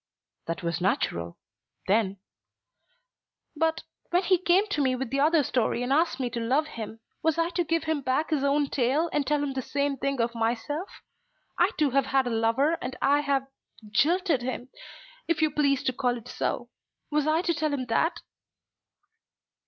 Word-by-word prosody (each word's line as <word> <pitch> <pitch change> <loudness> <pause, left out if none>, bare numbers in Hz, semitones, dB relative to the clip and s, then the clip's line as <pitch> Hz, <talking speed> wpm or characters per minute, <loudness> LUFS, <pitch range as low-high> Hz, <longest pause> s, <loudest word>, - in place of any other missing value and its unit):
"That 165 +2 -3
was 170 +1 -2
natural, 85 - -1 0.5
then." 200 -1 +2 1.4
"But, 320 +1 0 0.3
when 355 +2 +2
he 370 -1 +3
came 370 +3 +3
to 305 - 0
me 260 -2 +2
with 255 -2 -4
the 275 - 0
other 310 +1 +4
story 245 -1 0
and 255 +2 +1
asked 315 -2 +2
me 255 - 0
to 235 - -3
love 260 +7 +1
him, 225 -5 -7 0.2
was 320 0 +1
I 335 0 +1
to 350 0 0
give 330 0 0
him 315 -2 -1
back 270 +5 0
his 290 -3 +1
own 280 0 +2
tale 280 +6 +1
and 290 -2 0
tell 295 -1 +1
him 280 -2 -2
the 265 - -2
same 280 +1 -1
thing 275 0 -2
of 230 0 +1
myself? 235 - -2 0.7
I - - +5
too 295 -3 +2
have 270 0 +2
had 270 -1 +2
a 245 - -2
lover, 230 +8 +2
and 255 +1 -4
I 285 +1 +3
have 280 -2 0 0.5
jilted 330 - +2
him, 250 0 -4 0.6
if 335 - +1
you 310 -1 +3
please 280 -2 +2
to 255 - 0
call 250 -1 0
it 235 +1 -12
so. - - -3 0.4
Was 300 0 +1
I 320 +3 +2
to 345 - +1
tell 310 -1 -1
him 270 -3 -2
that?" 320 +9 0
275 Hz, 185 wpm, -27 LUFS, 245-315 Hz, 1.4 s, I